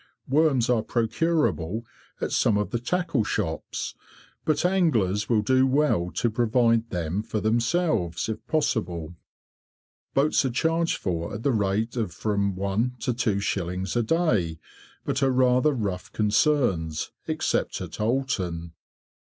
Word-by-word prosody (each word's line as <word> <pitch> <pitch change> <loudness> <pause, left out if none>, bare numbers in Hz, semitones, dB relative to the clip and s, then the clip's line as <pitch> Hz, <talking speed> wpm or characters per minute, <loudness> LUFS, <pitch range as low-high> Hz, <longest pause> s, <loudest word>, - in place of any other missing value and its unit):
Worms 135 -4 +3
are 120 -3 +2
procurable 115 - 0 0.4
at - - -2
some 105 - +3
of 105 - -1
the 120 - -1
tackle 145 -2 0
shops, - - -3 0.5
but 155 +2 +1
anglers 120 - +2
will 110 -3 +3
do 130 +4 +3
well 130 -11 +2
to 120 - 0
provide 115 0 +2
them 90 +2 -2
for 110 0 -3
themselves 115 - 0
if 110 -1 -4
possible. 90 - -1 1.0
Boats 145 +2 +3
are 135 - +1
charged 165 +7 +1
for 85 0 -3
at 110 - -6
the 140 - +3
rate 105 +3 0
of 110 -7 -1
from 100 +2 -1
1s. 100 +6 -1
to 125 - 0
2s. 95 -5 -1
a 120 - +3
day, 110 - +1 0.5
but 130 - -1
are 135 - +4
rather 130 +2 +3
rough 100 -9 -3
concerns, 105 - +1 0.2
except - - -1
at - - -6
Oulton. 95 -9 -1
115 Hz, 135 wpm, -26 LUFS, 95-130 Hz, 1.0 s, are